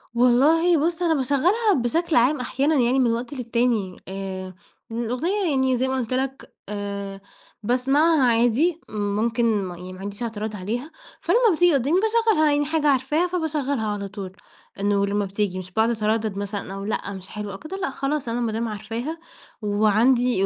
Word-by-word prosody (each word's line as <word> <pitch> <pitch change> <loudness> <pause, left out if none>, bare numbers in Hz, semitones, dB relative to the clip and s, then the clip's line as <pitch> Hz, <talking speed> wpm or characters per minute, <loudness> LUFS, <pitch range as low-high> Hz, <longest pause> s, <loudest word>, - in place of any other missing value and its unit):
والله 295 +8 +4
بُص 345 0 -1
أنا 335 -2 +3
باشغلها 335 - +2
بشكل 310 +7 0
عام 255 +5 +4
أحيانًا 275 +4 0
يعني 255 0 +3
من 240 -3 +3
وقت 240 +4 -3
للتاني. 235 -6 -1
آآ 190 -1 -6 0.4
إن 230 - -3
الأغنية 335 - -1
يعني 265 -2 +2
زي 260 +2 0
ما 265 - -1
قُلت 245 -1 -2
لك، 265 +1 -3 0.2
آآ 200 -1 -5 0.4
باسمعها 270 +6 +3
عادي، 245 +8 +3
ممكن 215 +1 0
م - - -6
يعني 180 +2 -9
ما 185 - -11
عنديش 205 +4 -6
اعتراض 220 -1 -4
عليها، 230 - -4 0.3
فلمّا 360 +8 +3 0.2
بتيجي 350 0 +4
قدامي 280 +7 +2
باشغلها، 440 -8 +3
يعني 290 0 +1
حاجة 305 0 0
عارفاها 285 +6 +2
فباشغلها 295 -9 -1
على 205 -1 -3
طول، 195 -2 -7 0.5
إنه 200 0 +2
لمّا 205 0 0
بتيجي 195 -1 -2
مش 185 0 -9
باقعد 220 +3 +2
اتردد 220 -2 -1
مثلًا 200 -1 -4
أقول 195 +1 -5
لأ 200 -2 -3
مش 190 0 -9
حلوة 210 -2 -6
أو 195 - -6
كده 345 +6 -7
لأ 385 0 -2
خلاص 280 -1 -2
أنا 235 +1 -1
مادام 230 0 -1
عارفاها 230 +9 -5 0.4
وعندي 215 +2 +3
240 Hz, 170 wpm, -23 LUFS, 205-295 Hz, 0.5 s, والله